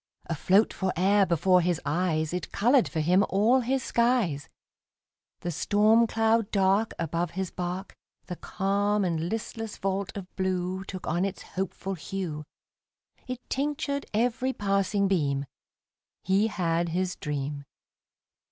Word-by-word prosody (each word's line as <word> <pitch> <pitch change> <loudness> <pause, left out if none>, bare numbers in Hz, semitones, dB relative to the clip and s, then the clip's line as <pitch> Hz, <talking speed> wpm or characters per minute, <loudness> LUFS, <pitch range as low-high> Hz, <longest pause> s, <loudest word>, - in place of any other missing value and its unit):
Afloat 185 +6 +2
fore'er 190 +1 +2
before 180 +2 +4
his 175 -2 0
eyes, 155 0 0
It 180 - -4
colored 245 +4 +3
for 160 - -1
him 180 +5 +4
all 220 +7 +4
his 260 +1 0
skies: 235 - +1 0.9
The 175 - -2
storm 215 +7 +3
cloud 225 -1 +2
dark 200 +2 +2
Above 165 +1 -1
his 190 -2 -2
bark, 180 +2 -4 0.3
The 180 - -5
calm 200 +1 0
and 165 -1 -1
listless 225 0 -4
vault 195 +1 -2
of 190 -2 -9
blue 185 0 -1
Took 185 -2 -7
on 175 +4 0
its 195 -1 -3
hopeful 190 +1 -3
hue, 170 -3 -4 0.8
It 255 -1 -6
tinctured 280 0 -2
every 245 +4 0
passing 200 -1 +1
beam 145 -7 0 0.8
He 195 +4 +3
had 170 -4 0
his 180 +2 -1
dream. 145 -1 -4
190 Hz, 130 wpm, -27 LUFS, 175-215 Hz, 0.9 s, before